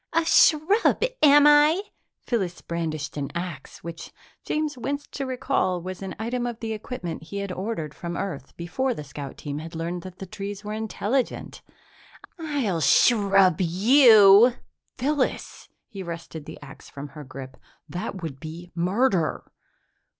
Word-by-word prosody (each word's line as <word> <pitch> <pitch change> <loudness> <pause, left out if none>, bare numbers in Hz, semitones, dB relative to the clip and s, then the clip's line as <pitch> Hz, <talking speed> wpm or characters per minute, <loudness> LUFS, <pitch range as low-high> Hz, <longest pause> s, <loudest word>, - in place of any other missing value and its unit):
"A 330 0 +2
shrub, 330 +10 +4 0.2
am 290 -1 +7
I!" 295 +5 +6 0.4
Phyllis 190 -8 -2
brandished 155 -3 -4
an 140 -1 -3
axe 170 -5 -6
which, 170 0 -8 0.3
James 305 -1 -2
winced 280 +3 -4
to 275 -1 -4
recall, 250 -8 0
was 185 +2 -7
an 190 -1 -6
item 240 +3 -2
of 235 -1 -5
the 225 -1 -3
equipment 210 -6 -6
he 170 +5 -8
had 200 -1 -3
ordered 180 -6 -4
from 170 +3 -6
Earth 145 -9 -5
before 245 +10 -2
the 150 - -6
scout 140 -1 -8
team 145 0 -5
had 165 +1 -8
learned 170 +2 -3
that 185 0 -10
the 190 - -7
trees 200 +1 -7
were 210 0 -5
intelligent. 220 +3 -2 0.8
"I'll 275 - -1
shrub 195 - +4
you!" 215 - +7 0.4
"Phyllis!" 280 +1 -2 0.2
He 200 -4 -8
wrested 165 -3 -7
the - - -9
axe 135 - -13
from 145 +1 -8
her 150 +2 -10
grip. 130 -1 -9 0.3
"That 180 +3 -5
would 140 -5 -5
be 165 +3 -9
murder!" 180 0 0
195 Hz, 150 wpm, -25 LUFS, 165-245 Hz, 0.8 s, am